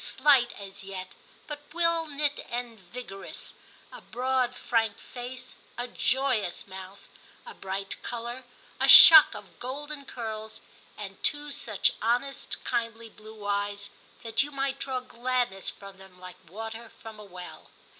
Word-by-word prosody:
slight 260 -3 +4
as 195 -1 -9
yet, 190 -1 -7 0.4
but 295 -1 -6 0.2
well 335 -1 +2
knit 290 0 -1
and 240 -2 -5
vigorous, 195 +1 -8 0.4
a - - -11
broad 255 0 -1
frank 225 -3 0
face, 250 +1 -9 0.2
a 245 +1 -3
joyous 255 -8 0
mouth, 190 +1 -10 0.4
a 475 - -9
bright 195 +1 -5
colour, 240 +2 -5 0.4
a - - +3
shock 315 -2 +11
of - - -12
golden 285 +3 -6
curls, 220 -4 -6 0.4
and - - -8
two 295 -1 +1
such 215 -7 +1
honest 245 +5 -1
kindly 230 -1 -2
blue 215 -1 -13
eyes, 205 0 -2 0.3
that 225 -1 +1
you 285 - -2
might 275 -1 -2
draw 260 -2 -3
gladness 245 -5 -1
from 195 -1 -12
them 190 -1 -15
like 180 -2 -12
water 225 +4 -7
from 220 -1 -10
a - - -9
well. 180 -3 -11
235 Hz, 140 wpm, -28 LUFS, 200-260 Hz, 0.4 s, shock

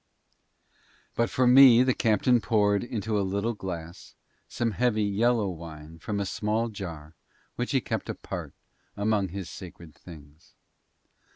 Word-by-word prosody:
But 115 - 0
for 130 - +1
me 125 -1 +8
the 130 0 +2
captain 115 +2 +2
poured 105 -2 +2
into 110 -3 -2
a - - +1
little 100 +4 -1
glass 85 -4 -8 0.3
some 115 -1 -2
heavy 110 0 +1
yellow 110 +2 +1
wine 80 -2 -9
from 100 +4 -3
a 100 - -1
small 110 +4 -1
jar 85 -7 -8 0.4
which - - -3
he - - +1
kept - - -4
apart - - -6 0.4
among 100 -1 +1
his 95 0 -6
sacred 85 -3 -11
things. 75 -3 -15
100 Hz, 135 wpm, -27 LUFS, 85-115 Hz, 0.4 s, me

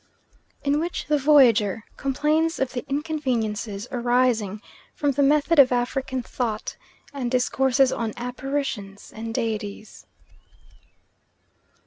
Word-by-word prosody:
In 285 +1 +1
which 340 +2 -3
the 300 -1 +1
Voyager 235 -8 +4
complains 305 +4 0
of 265 -1 -2
the 245 - -3
inconveniences 235 -9 -2
arising 240 -4 +1 0.4
from 290 -1 +1
the 280 +1 0
method 295 +3 +3
of 260 -2 +7
African 255 +1 -1
thought, 225 -3 -3 0.4
and 260 -4 -3
discourses 260 +1 +2
on 230 -3 -2
apparitions 245 -5 -4
and 225 +1 -5
Deities. 215 -3 -4
255 Hz, 105 wpm, -24 LUFS, 225-280 Hz, 0.4 s, of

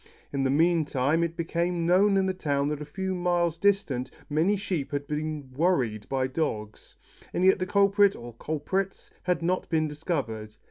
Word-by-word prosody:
In 140 - 0
the 135 - +2
mean 165 +4 +3
time 145 +3 +1
it 170 0 -3
became 170 +1 -1
known 195 +3 +4
in 190 - +2
the 190 - 0
town 145 -5 0
that 150 0 -3
a - - -4
few 190 +5 -3
miles 175 -2 +1
distant 170 -11 +1 0.2
many 170 +8 +2
sheep 180 -8 -3
had 145 0 -2
been 150 -2 -4
"worried" 130 - +1
by 130 -1 +1
dogs, 120 -7 -4 0.4
but - - -5
as - - +4
yet 190 0 +5
the 185 - -1
culprit 200 0 +4
or 120 0 -9
culprits 160 - -3
had 180 -2 0
not 185 +2 0
been 155 -1 +1
discovered. 130 - -4
160 Hz, 185 wpm, -27 LUFS, 140-185 Hz, 0.4 s, yet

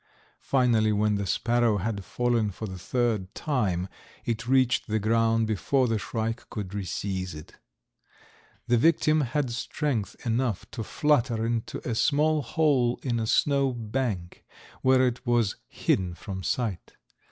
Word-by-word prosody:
Finally 120 -5 +2
when 105 0 +2
the 100 -1 -1
sparrow 120 +1 +2
had 100 +1 -3
fallen 120 0 0
for 100 +3 -6
the 95 -3 -7
third 110 -3 -1
time 100 - -1 0.4
it 115 0 -2
reached 130 -1 +3
the 110 0 0
ground 115 +1 +2
before 125 +5 +1
the 115 -2 0
shrike 115 +2 -3
could 105 -4 -5
reseize 95 -2 -3
it. 75 - -12 1.1
The 120 -1 +3
victim 155 +1 +3
had 130 0 -1
strength 120 - -2
enough 120 -2 0
to 115 - -4
flutter 120 -5 +1
into 115 -1 -3
a 120 - 0
small 150 +5 +2
hole 135 -4 +1
in 120 -3 0
a 110 - -1
snow 140 +1 +2
bank, 110 -6 -3 0.4
where 130 0 +4
it 125 -1 -2
was 120 -5 +1
hidden 90 -2 0
from 95 +3 -6
sight. 100 +1 -2
115 Hz, 140 wpm, -27 LUFS, 105-125 Hz, 1.1 s, where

